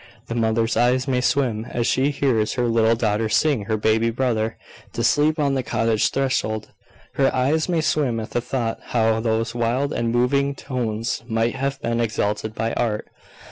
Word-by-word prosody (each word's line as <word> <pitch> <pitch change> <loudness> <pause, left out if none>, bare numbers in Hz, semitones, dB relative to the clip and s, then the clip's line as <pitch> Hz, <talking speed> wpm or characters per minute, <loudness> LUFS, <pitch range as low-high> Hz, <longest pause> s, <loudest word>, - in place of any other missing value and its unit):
The - - -2
mother's 115 0 +1
eyes 125 +2 +2
may 125 -2 +1
swim 125 -5 0
as 120 -1 -2
she 135 +4 +2
hears 125 -7 +1
her 125 -2 0
little 115 0 +3
daughter 110 -1 0
sing 135 -3 +2
her 110 0 0
baby 110 +2 +2
brother 115 -2 -1 0.4
to - - -2
sleep 155 +2 +3
on 145 -2 +1
the 135 - 0
cottage 115 -2 +1
threshold, 110 -5 -1 0.5
her 135 -1 +4
eyes 145 +6 +1
may 170 -2 +1
swim 150 -7 0
at 110 - -6
the 120 - 0
thought 120 -2 -2
how 110 -1 +1
those 115 0 -1
wild 120 +4 0
and 115 -1 -1
moving 140 +4 +1
tones 115 -4 -3
might 115 0 0
have 135 +1 -2
been 115 0 0
exalted 110 -1 -1
by 115 0 -1
art. 110 -3 -2
120 Hz, 180 wpm, -22 LUFS, 110-135 Hz, 0.5 s, her